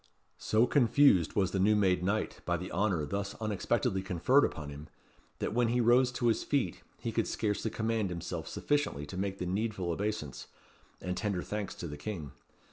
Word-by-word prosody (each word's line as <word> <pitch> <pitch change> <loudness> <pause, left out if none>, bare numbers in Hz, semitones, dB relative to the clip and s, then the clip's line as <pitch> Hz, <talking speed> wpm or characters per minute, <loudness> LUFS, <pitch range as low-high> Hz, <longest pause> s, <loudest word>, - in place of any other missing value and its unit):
So 110 +2 +3
confused 125 - +4
was 95 -2 +2
the 95 - -1
new 105 +3 +4
made 95 -4 +3
knight 105 +3 -1
by 85 0 0
the 90 +2 -6
honour 95 -8 +1
thus 100 +5 -3
unexpectedly 105 -3 0
conferred 95 - +3
upon 75 -1 -2
him, 75 +2 -9 0.5
that - - -2
when 120 0 +3
he 120 +2 +1
rose 125 +2 +4
to 125 - -2
his 115 -2 +2
feet 135 -12 -1 0.2
he - - -4
could - - 0
scarcely 105 +1 -1
command 110 -2 -1
himself 85 -2 -5
sufficiently 145 - -1
to 75 - -8
make 95 +1 -2
the 90 - -3
needful 95 -1 -1
obeisance, 100 - -3 0.5
and 90 0 -3
tender 100 -4 -1
thanks 105 -2 -4
to 85 - -6
the 75 -1 -7
King. 75 -3 -5
100 Hz, 185 wpm, -31 LUFS, 90-110 Hz, 0.5 s, confused